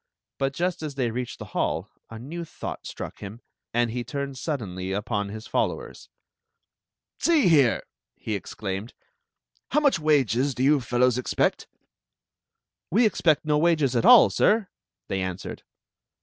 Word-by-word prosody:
But 135 0 0
jv 180 +3 -1
t 155 - -5
as 140 - -9
they 125 -4 0
reached 125 +1 -4
the - - -8
hall - - -1 0.2
a 115 - -8
new 150 +9 -6
thou^l 160 - -7 0.2
r.ck - - -6
him, 100 +3 -8 0.3
and 120 0 +1
he 120 +1 -3
turned 140 +2 -4
suddenly 95 - -4
upon 105 0 -2
his 110 +2 -8
followers: - - -3 1.1
"See 320 - +3
here!" 140 -8 +4 0.3
he 110 - -5
exclaimed. 100 +2 -5 0.7
"How - - +3
much 285 - +3
wages 140 - +2
do 130 - -1
you 145 0 +4
fellows 125 0 +2
expect.^" 125 - 0 1.2
"We 225 +7 +4
expect 160 -8 +2
no 150 -1 +2
wages 155 -6 +2
at 120 - +2
all, 245 +3 +8
sir," 215 -3 +2 0.4
they 95 - -2
answered. 95 +1 -5
130 Hz, 150 wpm, -25 LUFS, 110-155 Hz, 1.2 s, all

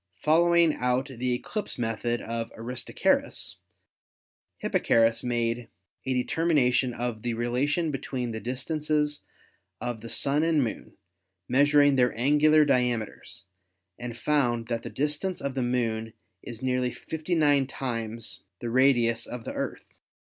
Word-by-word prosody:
Following 170 - +4
out 125 +1 0
the 125 -1 -2
eclipse 210 - -4
method 120 0 -2
of 115 0 -4
Aristarchus, 120 +2 -1 1.0
Hipparchus 115 0 +2
made 120 -1 -1 0.4
a 130 - +1
determination 130 -2 +2
of 120 -2 -3
the 120 0 -2
relation 135 +8 0
between 130 -3 -3
the 110 - -4
distances 150 +4 -1 0.6
of 120 -1 -4
the 115 - -8
Sun 140 +6 +1
and 160 -3 +3
Moon, 115 - -6 0.5
measuring 145 +1 +4
their 125 -2 +2
angular 150 +4 +5
diameters, 125 -5 -1 0.5
and 120 -1 -6
found 120 -4 +1
that 115 -1 -1
the - - -6
distance 150 +6 -1
of 140 - -3
the 130 - -1
Moon 115 -3 -1 0.3
is 120 +1 -9
nearly 125 -1 +1
59 150 -4 +1
times 115 -4 -4 0.2
the 120 -1 -4
radius 120 -3 +3
of 125 -2 -6
the - - -5
Earth. - - -4
125 Hz, 125 wpm, -27 LUFS, 115-145 Hz, 1.0 s, angular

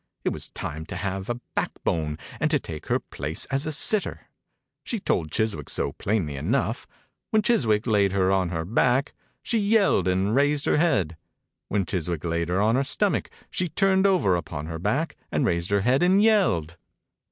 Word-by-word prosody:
It - - +1
was - - -5
time 75 +2 -6
to - - -6
have 95 +1 -3
a 120 0 -2
backbone 75 -2 -2 0.2
and 150 - +1
to 150 -1 +2
take 80 - -8
her - - +2
place 75 +4 -4
as 140 +2 0
a - - -1
sitter. 200 +7 +1 0.6
She 230 - -3
told 80 - 0
Chiswick 90 -5 -1
so - - -1
plainly 95 -9 -1
enough. 70 - -1 0.4
When 215 -1 +2
Chiswick 115 - +2
laid 100 -4 +3
her 95 -1 +2
on 95 -2 +1
her 80 -2 -3
back 125 - +2 0.3
she 230 - 0
yelled 200 - +3
and 95 +3 +1
raised 145 +1 +2
her - - +3
head. 100 - +1 0.5
When 100 -2 0
Chiswick 85 -2 -3
laid 85 0 -1
her 90 +2 +1
on 110 +2 +3
her 135 +3 +2
stomach 200 +8 0 0.2
she 180 -1 -1
turned 190 +3 +3
over 160 - +3
upon 80 -3 -4
her 80 0 -5
back 130 - -1
and - - +1
raised 85 0 0
her 100 0 +2
head 125 +6 +2
and 185 +3 +4
yelled. 180 - +2
105 Hz, 185 wpm, -25 LUFS, -, 0.6 s, and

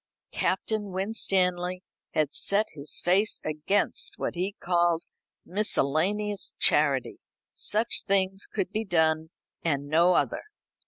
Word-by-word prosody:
Captain 215 -2 -1
Winstanley 185 -2 0 0.3
had 150 -2 +1
set 205 +2 +2
his 145 -1 +1
face 190 +5 +2
against 200 - -1
what - - -3
he 185 +3 -3
called 175 -1 +1 0.4
miscellaneous 200 +2 0
charity. - - +2 0.3
Such 220 +2 +2
things 195 -1 +1
should 195 -3 -2
be 220 +1 -2
done 160 -4 +1 0.3
and 140 -4 -1
no 165 +5 +3
other. - - 0
185 Hz, 110 wpm, -27 LUFS, 160-205 Hz, 0.4 s, no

